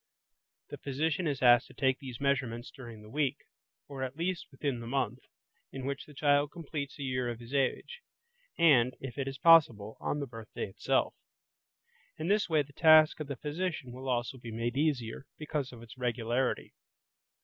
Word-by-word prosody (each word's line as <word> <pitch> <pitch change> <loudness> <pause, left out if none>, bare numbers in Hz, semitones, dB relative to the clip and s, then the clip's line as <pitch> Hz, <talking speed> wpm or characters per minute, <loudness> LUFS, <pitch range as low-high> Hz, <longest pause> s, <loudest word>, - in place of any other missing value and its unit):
The - - -7
physician 160 +6 -1
is 140 -3 -2
asked 120 -1 +6
to - - -17
take 130 -2 +1
these 130 -4 -8
measurements 130 -4 -1
during 120 -6 -11
the 105 - -13
week, 145 -2 0 0.5
or 140 -2 -7
at 130 0 -3
least 170 +2 -2
within 135 -2 -3
the 115 - -7
month, 125 -2 -1 0.5
in 135 -1 -6
which 140 0 -4
the 150 - -14
child 145 0 +3
completes 150 -4 -6
a 145 - -5
year 125 -2 -1
of 120 -1 -5
his 120 +3 -11
age, 140 - -1 0.6
and, 130 -6 +5
if 130 -1 -7
it 135 - -1
is 135 0 -4
possible, 130 -10 +5
on 150 - -2
the 140 - -2
birthday 115 -3 -6
itself. 95 - 0 1.0
In 160 +3 -3
this 210 -2 +2
way 155 -2 +3
the 140 0 -18
task 155 0 +6
of 155 - -4
the 140 - -4
physician 150 -2 -3
will 130 +2 -6
also 125 +1 -1
be 120 - -8
made 115 +2 -2
easier, 135 -4 -1
because 150 -3 -3
of 120 -2 -11
its 115 +2 -12
regularity. 120 +1 -1
135 Hz, 180 wpm, -31 LUFS, 120-150 Hz, 1.0 s, asked